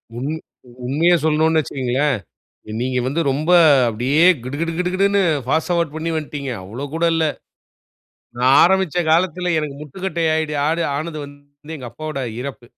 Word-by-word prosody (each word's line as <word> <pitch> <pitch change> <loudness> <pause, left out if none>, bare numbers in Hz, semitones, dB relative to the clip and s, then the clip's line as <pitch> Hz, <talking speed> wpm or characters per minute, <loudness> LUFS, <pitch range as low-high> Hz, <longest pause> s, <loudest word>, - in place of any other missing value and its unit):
உமி 135 +6 -3 0.5
உண்மைய 155 +7 +3
சொல்லணும்ன்னு 160 +1 +3
வச்சுக்கங்களேன், 135 0 -1 0.6
நீங்க 125 0 -1
வந்து 150 +6 0
ரொம்ப 155 +6 -1 0.4
அப்படியே 125 +7 0 0.2
கிடு 130 +3 -5
கிடு 165 0 -1
கிடு 180 0 0
கிடுன்னு 200 +1 +2 0.2
ஃபாஸ்ட் 160 +6 0
ஃபார்வார்ட் 170 -3 0
பண்ணி 160 +1 -3
வன்ட்டீங்க. 145 -3 -4
அவ்வளோ 115 +9 -6
கூட 165 +1 +1
இல்ல. 165 -1 +1 1.1
நா 125 - -4 0.2
ஆரம்பிச்ச 190 -2 +2
காலத்தில 180 +1 +1
எனக்கு 150 -2 -3
முட்டுக்கட்டை 170 +3 -4
ஆயிடு 155 -1 -1
ஆது 165 +2 0
ஆனது 155 +1 -4
வந்து 145 +2 -14
எங்க 130 -4 -8
அப்பாவோட 155 0 -6 0.2
இறப்பு. 130 -2 -7
155 Hz, 145 wpm, -20 LUFS, 140-165 Hz, 1.1 s, உண்மைய